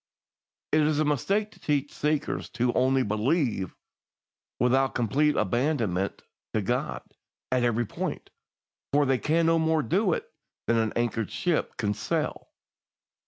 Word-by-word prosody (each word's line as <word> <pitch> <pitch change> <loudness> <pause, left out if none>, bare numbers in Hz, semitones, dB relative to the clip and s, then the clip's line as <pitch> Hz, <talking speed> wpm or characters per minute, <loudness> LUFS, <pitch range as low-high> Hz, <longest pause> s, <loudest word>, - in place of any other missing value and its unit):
"It 155 - +4
is 150 0 +2
a 155 - +3
mistake 195 - 0
to - - -19
teach 145 -1 -1
seekers 150 0 -1
to 120 0 +2
'only 130 0 +3
believe,' 110 - 0 0.8
without 130 +2 +2
complete 145 +6 +2
abandonment 110 - 0 0.3
to - - +1
God - - -2 0.5
at 130 -1 +2
every 120 0 +1
point, - - -5 0.6
for 145 +1 +4
they 130 -2 +2
can 165 +2 +2
no 165 0 +4
more 160 -1 +2
do 185 +1 +2
it - - -3 0.4
than 115 - +2
an 110 -1 +1
anchored 115 -2 -1
ship 175 -3 -1
can 105 -3 0
sail. 105 -1 -2
135 Hz, 140 wpm, -27 LUFS, 115-155 Hz, 0.8 s, It